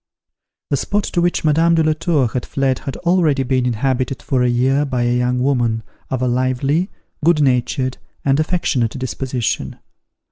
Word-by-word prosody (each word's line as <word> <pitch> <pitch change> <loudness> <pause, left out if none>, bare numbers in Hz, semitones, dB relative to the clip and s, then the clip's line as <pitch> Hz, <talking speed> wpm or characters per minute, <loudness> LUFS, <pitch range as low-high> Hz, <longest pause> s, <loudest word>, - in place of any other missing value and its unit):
The 140 - +2
spot 205 +9 -1
to 175 - -1
which 175 0 +1
Madame 165 +2 +4
de 160 - +3
la 155 0 +3
Tour 155 -4 +1
had 125 +2 -3
fled 135 -2 0
had 135 -3 -6
already 170 -6 +2
been 130 -1 +1
inhabited 130 +2 -1
for 130 -2 0
a 125 - +3
year 130 +4 +2
by 130 -4 -1
a 120 0 +1
young 125 0 +1
woman 120 -5 +1 0.3
of 130 -1 -2
a - - +2
lively, 130 - 0 0.3
good 170 0 +4
natured 130 -1 +1 0.3
and 140 +1 +3
affectionate 155 - 0
disposition. 130 -1 -3
135 Hz, 170 wpm, -19 LUFS, 125-155 Hz, 0.3 s, Madame